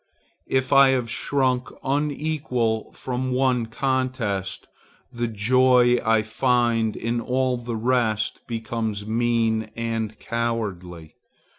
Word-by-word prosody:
If 130 +1 0
I 135 -1 +7
have 115 -2 -4
shrunk 130 0 0
unequal 140 -5 -1
from 130 0 -3
one 125 -3 +1
contest, 120 -6 -2 0.5
the 120 0 -1
joy 125 +3 +4
I 110 -2 +3
find 115 -1 +1
in 115 +1 -2
all 130 +1 0
the 120 -1 -5
rest 110 -2 0
becomes 110 -3 -3
mean 115 -1 0
and 115 -2 -3
cowardly. 100 -9 -4
120 Hz, 105 wpm, -24 LUFS, 110-130 Hz, 0.5 s, I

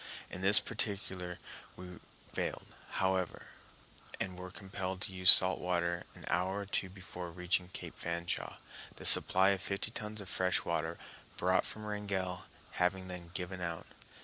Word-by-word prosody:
In 90 - -7
this 95 +2 +7
particular 95 -5 -4 0.4
we 90 -1 -10 0.3
failed, - - -3 0.3
however, 95 -2 -1 0.7
and 95 -1 -3
were 90 0 -8
compelled 95 -1 -5
to 100 - -3
use 95 0 +6
salt 95 0 +10
water 85 -1 -1
an - - -12
hour 95 +3 -1
or - - -6
two 95 -1 0
before 90 -2 -9
reaching 90 +1 -1
Cape - - -8
Fanshawe, 85 +1 -3 0.4
the - - -9
supply 95 +1 +6
of 100 -2 0
fifty 100 +2 -2
tons 105 -1 -5
of 100 - -7
fresh 90 0 +1
water - - -2 0.4
brought - - +1
from 110 0 -6
Wrangell 100 -3 -4 0.3
having 95 +1 -1
then 90 -2 -8
given 90 0 -5
out. 85 -2 -4
95 Hz, 150 wpm, -33 LUFS, 90-95 Hz, 0.7 s, salt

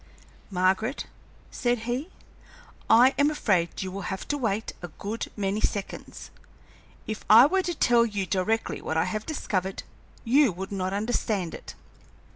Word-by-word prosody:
"Margaret," 190 +7 0 0.5
said 240 -2 0
he, 250 +8 -2 0.8
"I 250 +4 +7
am 285 +1 +5
afraid 190 - 0
you 185 - -5
will 195 -1 -5
have 190 0 -5
to 290 - 0
wait 220 -3 -1
a 175 - -5
good 205 +7 -5
many 200 +1 -1
seconds. 200 -2 -4 0.7
If 215 0 -5
I 225 +4 +10
were 380 +6 +2
to 350 -2 -3
tell 240 -4 +4
you 205 -4 -2
directly 200 +4 -1
what 160 - -2
I 160 - +2
have 215 0 -4
discovered, 195 - -2 0.4
you 265 +1 +4
would 190 +3 -6
not 185 -1 -2
understand 205 -3 -1
it. - - -9
215 Hz, 150 wpm, -26 LUFS, 190-245 Hz, 0.8 s, I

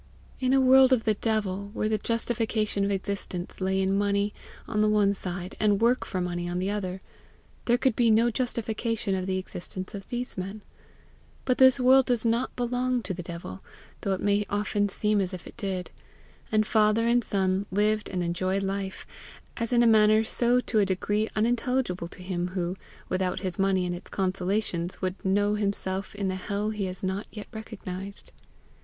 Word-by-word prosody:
In 255 -1 +1
a 270 - +5
world 265 0 +6
of 250 -3 +3
the 215 - +2
devil, 200 -2 -1
where 215 - 0
the 215 -1 0
justification 225 -2 0
of 200 - +1
existence 195 -2 -3
lay 190 +1 +1
in 190 0 +1
money 200 0 +1 0.3
on 210 - 0
the 215 - +4
one 205 -1 +3
side, 180 -1 -5
and 205 -2 +3
work 240 +3 +2
for 185 - -2
money 175 -1 -2
on 175 - -2
the 190 +2 -1
other, 190 -2 -3 0.6
there 240 0 +3
could 260 -3 +1
be 235 -2 +3
no 230 +2 +4
justification 230 -3 -1
of 185 0 -2
the 190 0 0
existence 185 0 -6
of 195 -1 -8
these 245 -4 -4
men; 195 +3 -6 0.8
but 255 - +1
this 260 0 +7
world 260 +1 +5
does 240 -2 +1
not 230 +3 0
belong 245 0 0
to 190 - -2
the 180 - -5
devil, 170 - -8 0.4
though 195 - 0
it 190 - -3
may 205 0 +2
often 205 0 0
seem 210 +1 +1
as 185 0 -2
if 180 - -10
it - - -11
did, 195 -5 -4 0.6
and 215 0 +3
father 215 +1 +3
and 240 0 +3
son 190 0 0
lived 210 +2 +1
and 180 -2 -2
enjoyed 185 +3 -1
life, 195 0 -3 0.5
as 230 0 -2
in 240 -1 +5
a - - +4
manner 215 -1 +5
so 240 +2 +3
to 235 -3 0
a - - +5
decree 205 +3 0
unintelligible 235 -5 0
to 180 - -11
him 180 -1 -2
who, 175 0 -1 0.3
without 185 0 -1
his 185 -1 -2
money 190 -1 +2
and 175 - -2
its 175 +3 -8
consolations, 185 -1 -1
would 185 0 -3
know 205 +2 +2
himself 200 -2 -2
in 200 -1 -2
the 185 - 0
hell 205 +3 -2
he 210 -2 -2
has 185 0 -5
not 190 +2 -2
yet 210 -1 -7
recognized. 200 -3 -7
205 Hz, 190 wpm, -27 LUFS, 190-225 Hz, 0.8 s, this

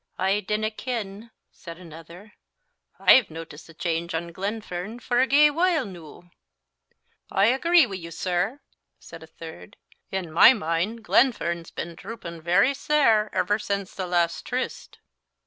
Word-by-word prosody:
"I 190 +2 +1
dinna 215 +2 -2
ken," 220 -2 -5 0.2
said 170 -2 -11
another; 170 +4 -13 0.6
"I've 255 -5 +6
notic'd 165 -1 -10
a - - -13
chainge 170 0 -2
on 170 +1 -4
Glenfern 200 +2 -5
for 245 0 0
a 260 - +2
gey 295 +2 +5
while 335 -2 +1
noo." 175 -1 -12 1.0
"I 195 - +3
agree 320 +7 +4
wi' 195 -5 -6
you, 170 -2 -9
sir," 185 +10 -2 0.4
said 165 0 -12
a 160 - -12
third. 160 - -12 0.3
"In 185 -4 -4
my 175 +10 +8
mind 200 +3 -2
Glenfern's 170 -10 +1
been 170 - -6
droopin' 170 -4 -9
very 195 - +3
sair 270 -7 +2
ever 205 +1 0
since 200 -2 -3
the 185 -2 -4
last 170 -1 0
tryst." 255 +1 -5
195 Hz, 145 wpm, -25 LUFS, 170-230 Hz, 1.0 s, my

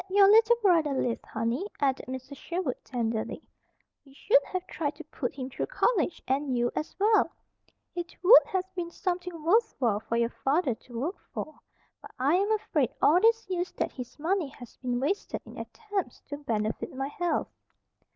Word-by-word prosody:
"Had 380 - -4
your 400 -1 +8
little 445 +3 +7
brother 330 -7 +4
lived, 245 -3 -1
honey," 230 - -1
added 275 0 0
Mrs. 260 +2 -6
Sherwood 335 -3 -3
tenderly, 230 -3 -2 0.6
"we 275 -1 -19
should - - +4
have 370 0 -4
tried 305 -4 -3
to 320 - -9
put 280 -5 -4
him 260 -2 -4
through 265 - -4
college, 485 -8 +1
and 265 -1 0
you, 240 0 +1
as 305 - -3
well. 425 +2 +4 0.6
It 345 -1 -5
would 435 +8 +9
have 375 -1 0
been 350 -2 -3
something 355 -2 -3
worthwhile 325 - +2
for 230 +1 -2
your 235 0 +1
father 275 -1 +2
to 230 +1 -9
work 330 +10 -3 0.2
for. 310 - -4 0.5
But - - -11
I 275 +4 +2
am 395 +4 +2
afraid 325 - +1
all 345 +4 +5
these 455 +1 +4
years 365 -1 -2
that - - -2
his 250 -2 -8
money 335 +2 0
has 245 -3 -13
been 245 -1 -2
wasted 310 +10 -1
in - - -12
attempts 410 - -4
to 285 - -4
benefit 220 -6 -2
my 270 +1 -2
health." 350 +3 -1
305 Hz, 180 wpm, -28 LUFS, 255-375 Hz, 0.6 s, would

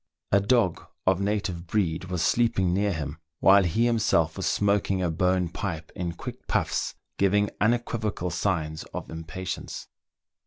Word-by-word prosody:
A 100 - +6
dog 105 -3 +2 0.2
of 95 0 +3
native 100 -4 -1
breed 90 -3 0
was 90 -2 -2
sleeping 95 -7 +2
near 100 +2 +2
him, 75 -2 -4 0.2
while 100 +1 +7
he 95 +7 +2
himself 110 -9 +2
was - - -2
smoking 100 -1 +2
a 85 - +1
bone 90 +1 +2
pipe 85 -2 -5
in 85 -2 -3
quick - - -8
puffs, - - 0 0.2
giving 105 +1 +3
unequivocal 110 -5 0
signs 80 -4 -1
of - - -5
im 80 0 -6
patience. 95 +3 -5
95 Hz, 150 wpm, -26 LUFS, 85-105 Hz, 0.2 s, while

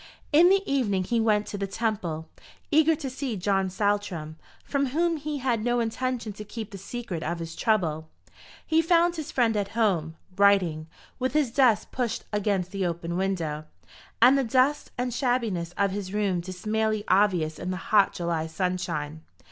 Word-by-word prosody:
In 335 +4 +7
the 390 +1 +4
evening 215 -9 +1
he 235 +5 0
went 210 -2 +2
to 205 - -6
the 200 - -2
Temple, 195 -7 -2 0.4
eager 315 +1 +5
to 290 -2 -6
see 260 -3 -4
John 195 0 +1
Saltram, 195 -5 -1 0.3
from 280 -1 0
whom 330 +5 +1
he 300 0 -4
had 245 -5 0
no 240 0 +1
intention 235 -1 -2
to 210 - -8
keep 220 0 -7
the 195 - -8
secret 200 -4 -5
of 170 +2 -2
his 165 -1 -6
trouble. 160 -8 0 0.6
He 320 0 +3
found 340 +1 +3
his 315 0 -5
friend 230 -3 +2
at 205 -1 0
home, 170 -8 +1 0.2
writing, 185 -6 +3 0.3
with 260 +1 -1
his 295 -6 +2
desk 245 -4 +3
pushed 245 -3 -2
against 195 -3 0
the 195 -1 -2
open 170 -1 -2
window, 170 -5 -2 0.5
and 250 +4 +7
the 275 - +2
dust 260 +5 +2
and 250 0 -2
shabbiness 230 -9 -1
of 200 -1 +2
his 195 -1 -4
room 200 -3 0
dismally 215 +4 -1
obvious 185 -5 +2
in 180 - -4
the 185 - -2
hot 200 +1 +3
July 170 -2 -2
sunshine. 160 -3 -3
205 Hz, 170 wpm, -26 LUFS, 180-250 Hz, 0.6 s, In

